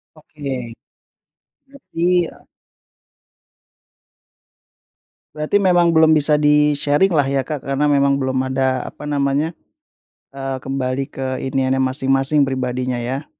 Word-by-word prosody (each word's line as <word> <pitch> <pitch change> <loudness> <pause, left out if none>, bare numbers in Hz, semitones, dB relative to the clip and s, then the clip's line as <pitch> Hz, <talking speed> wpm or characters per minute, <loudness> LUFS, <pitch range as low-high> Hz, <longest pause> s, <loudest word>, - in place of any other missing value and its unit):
Oke, 140 -6 -7 0.9
berarti, 180 -11 -1
e - - -15 2.9
Berarti 155 +7 0
memang 175 -2 +3
belum 160 0 +5
bisa 150 -1 +3
di-sharing 150 +3 +2
lah 145 - +4
ya 135 0 -1
Kak, 150 -4 -4
karena 140 +2 0
memang 140 -1 +2
belum 130 -1 -2 0.2
ada 130 -1 0
apa 150 - -9
namanya, 145 +3 0 0.8
eee, 135 -1 -5
kembali 135 0 -2
ke 135 - -5 0.2
iniannya 130 0 +1
masing-masing, 135 +2 +1
pribadinya 130 -1 -2
ya? 130 +5 -4
140 Hz, 110 wpm, -19 LUFS, 135-150 Hz, 2.9 s, belum